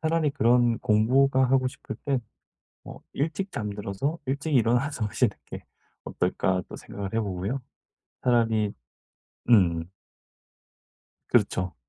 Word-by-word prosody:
차라리 160 -2 +1
그런 120 -1 +3
공부가 130 +4 +3
하고 130 0 +2
싶을 - - -9
때 135 -3 +1 0.7
뭐 - - -10
일찍 165 +7 -2
잠들어서 105 - -3
일찍 140 +3 -2
일어나서 120 +1 +2
하시는 105 +1 +1
게 - - -8 0.4
어떨까 90 0 0
또 - - -7
생각을 100 0 -7
해 115 - +2
보고요. 100 +5 -2 0.6
차라리 115 -4 +2 0.8
음. 85 -5 +4 1.4
그렇죠. 90 0 +1
120 Hz, 240 characters per minute, -26 LUFS, 100-135 Hz, 1.4 s, 음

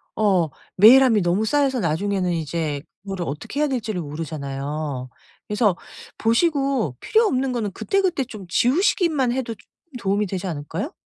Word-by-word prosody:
어 190 -7 +2 0.3
메일함이 230 +2 +7
너무 180 +5 +1
쌓여서 275 +1 +1
나중에는 185 +1 0
이제 160 -2 -2 0.2
그거를 195 -3 -4
어떻게 150 - -5
해야 300 - +3
될 260 -4 -1
지를 210 -4 -3
모르잖아요. 145 -3 -5 0.4
그래서 210 -3 +2 0.4
보시고 270 - +1
필요 450 +1 +3
없는 265 -8 0
거는 225 -5 -2
그때그때 375 - 0
좀 215 -6 -10
지우시기만 280 - +2
해도 250 -2 -2
좀 205 - -23 0.3
도움이 200 0 0
되지 190 -1 -4
않을까요? 170 - -4
205 Hz, 355 characters per minute, -22 LUFS, 165-260 Hz, 0.4 s, 메일함이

